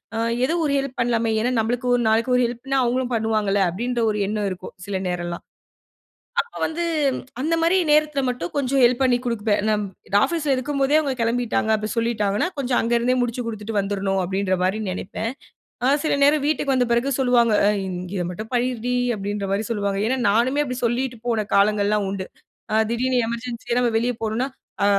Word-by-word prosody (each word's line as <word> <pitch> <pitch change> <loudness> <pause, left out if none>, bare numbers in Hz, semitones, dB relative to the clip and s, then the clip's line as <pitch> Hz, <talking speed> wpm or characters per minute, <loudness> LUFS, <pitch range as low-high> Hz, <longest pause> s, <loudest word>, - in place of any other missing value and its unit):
அ - - -2 0.3
எதோ 320 - 0
ஒரு 280 - +1
ஹெல்ப் 270 -1 -4
பண்ணலாமே! 230 -1 +1
ஏன்னா 245 +3 +1
நம்மளுக்கு 240 +3 -1
ஒரு 240 - +1
நாளைக்கு 230 +3 +2
ஒரு - - +3
ஹெல்ப்னா 250 +3 -3
அவுங்களும் 250 +1 0
பண்ணுவாங்கல்ல, 215 -3 +1
அப்பிடின்ற 240 +7 -2
ஒரு 210 - -3
எண்ணம் 210 -1 -1
இருக்கும். 185 - -8
சில 200 - -1
நேரம்லாம் 175 -1 -4 1.0
அப்போ 470 0 -13
வந்து 340 +2 -2 0.6
அந்தமாரி 330 +4 +2
நேரத்தில 300 -2 +3
மட்டும் 210 -9 -4
கொஞ்சம் 275 -1 +1
ஹெல்ப் 245 +2 +4
பண்ணிக் 250 -1 +2
கொடுப்பேன். 220 -3 0
நான் 210 -1 +1 0.4
ஆஃபீஸ்ல 295 -1 +1
இருக்கும்போதே 275 +2 0
அவுங்க 280 -3 -1
கிளம்பிட்டாங்க, 230 -1 0
அப்பிடி 215 0 -3
சொல்லீட்டாங்கன்னா, 220 - +1
கொஞ்சம் 260 -3 +1
அங்கருந்தே 235 +2 +1
முடிச்சு 245 0 -2
கொடுத்துட்டு 215 -1 -5
வந்துரணும் 195 -1 -1
அப்பிடின்றமாரி 190 +1 0
நினைப்பேன். 195 +4 -4 0.6
அ - - +4 0.2
சில 310 - +1
நேரம் 290 0 +4
வீட்டுக்கு 295 -3 +1
வந்த 250 -2 +2
பிறகு 255 +4 +1
சொல்லுவாங்க. 245 -3 +3
அ - - +5 0.2
இங்க 180 -1 -5
இத 175 - -1
மட்டும் 215 +5 -7
பண்ணிருடி! 245 0 0 0.2
அப்பிடின்றமாரி 200 +1 -2
சொல்லுவாங்க. 200 -2 -1
ஏன்னா 260 +2 +1
நானுமே, 255 +7 +2
அப்பிடி 250 -1 -4
சொல்லிட்டு 240 0 -1
போன 220 -3 0
காலங்கள்லாம் 205 0 +2
உண்டு. 190 -1 -4 0.5
அ - - +3 0.2
திடீர்னு 250 +2 +1
எமர்ஜென்சியா 235 0 -3
நம்ம 240 - +2
வெளிய 245 +2 0
போணுன்னா, 225 +4 -1 0.4
அ - - +4
235 Hz, 170 wpm, -22 LUFS, 210-255 Hz, 1.0 s, அ